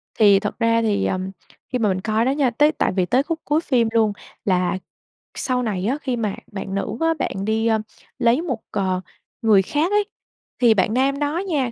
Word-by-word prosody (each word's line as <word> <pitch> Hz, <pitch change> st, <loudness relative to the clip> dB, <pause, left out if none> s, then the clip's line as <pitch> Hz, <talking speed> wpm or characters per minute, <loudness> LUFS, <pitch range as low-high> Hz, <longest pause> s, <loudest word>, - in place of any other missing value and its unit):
Thì 200 Hz, -3 st, +6 dB
thật 210 Hz, +4 st, -4 dB
ra 230 Hz, 0 st, +3 dB
thì, 205 Hz, -3 st, +1 dB
ờm, 185 Hz, 0 st, -2 dB, 0.4 s
khi 250 Hz, -, 0 dB
mà 215 Hz, -3 st, +2 dB
mình 185 Hz, 0 st, -1 dB
coi 220 Hz, +2 st, +1 dB
đó 265 Hz, -, +2 dB
nha, 280 Hz, -3 st, +2 dB
tới 295 Hz, +6 st, +3 dB
tại -, -, 0 dB
vì 185 Hz, -2 st, +2 dB
tới 255 Hz, +7 st, +2 dB
khúc 330 Hz, +1 st, -3 dB
cuối 300 Hz, +3 st, +2 dB
phim 245 Hz, -7 st, +2 dB
luôn 220 Hz, -2 st, +2 dB, 0.3 s
là 180 Hz, -1 st, +1 dB, 0.6 s
sau 250 Hz, -1 st, -1 dB
này 195 Hz, -4 st, -2 dB
á, 270 Hz, +4 st, 0 dB
khi 255 Hz, -3 st, -1 dB
mà 215 Hz, -4 st, -2 dB, 0.2 s
bạn 195 Hz, -1 st, -5 dB
nữ 205 Hz, +3 st, -3 dB
á, 325 Hz, 0 st, +3 dB
bạn 195 Hz, +1 st, -2 dB
đi, 220 Hz, +1 st, +1 dB
ơ, 220 Hz, -1 st, +3 dB, 0.4 s
lấy 240 Hz, +6 st, +3 dB
một, 260 Hz, -10 st, -3 dB
ờ, 185 Hz, -2 st, -1 dB, 0.4 s
người 215 Hz, -4 st, +5 dB
khác 300 Hz, -, 0 dB
ấy, 415 Hz, 0 st, +3 dB, 0.6 s
thì 235 Hz, -3 st, +6 dB
bạn 210 Hz, +2 st, +1 dB
nam 275 Hz, +2 st, +1 dB
đó 295 Hz, +3 st, -1 dB
nha 270 Hz, -8 st, 0 dB
230 Hz, 215 wpm, -22 LUFS, 200-270 Hz, 0.6 s, Thì